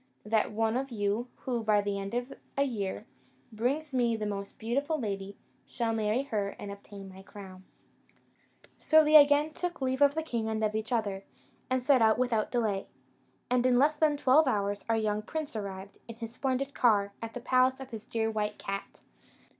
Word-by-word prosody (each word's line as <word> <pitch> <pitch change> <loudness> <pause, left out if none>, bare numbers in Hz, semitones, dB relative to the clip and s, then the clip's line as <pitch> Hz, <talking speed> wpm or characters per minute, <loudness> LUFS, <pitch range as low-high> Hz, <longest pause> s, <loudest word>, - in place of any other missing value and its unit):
That 215 0 +1
one 225 +2 0
of 270 +1 -3
you, 215 +1 -1 0.2
who, 240 -3 -1
by 215 -1 +3
the 200 -1 -2
end 195 +3 -5
of 245 +2 -3 0.2
a 280 - +4
year, 210 -8 -3 0.5
brings 270 +7 -2
me 240 -3 +2
the 215 -1 -3
most 200 -1 -5
beautiful 280 +8 -1
lady, 200 -3 -4 0.3
shall 230 -2 -1
marry 220 +3 0
her 205 -7 -2
and 200 - -7
obtain 200 0 -10
my 190 0 -12
crown." 190 -1 -12 1.1
So 315 0 +5
they 305 +1 +3
again 290 +1 +6
took 355 +1 -4
leave 260 0 -1
of 285 0 +5
the 320 - -1
king 230 -7 -2
and 220 0 -2
of 215 0 +1
each 220 +1 -3
other, 205 -5 -1 0.5
and 255 -1 0
set 265 -2 +4
out 220 0 +5
without 240 -4 +1
delay; 215 -5 -1 0.6
and 250 0 +2
in 250 -1 +4
less 295 +4 +4
than 300 -1 +2
twelve 285 +2 +4
hours, 205 -4 0
our 225 - +3
young 215 -1 0
prince 305 +4 -5
arrived, 200 -2 -6
in 230 - -8
his 230 0 -7
splendid 270 +2 -2
car, 205 -4 +3
at 230 +1 -6
the - - -3
palace 255 +2 +2
of 265 -1 -9
his 225 0 -8
dear 225 -1 -1
white 210 -1 -2
cat. 195 0 -6
225 Hz, 195 wpm, -30 LUFS, 205-260 Hz, 1.1 s, again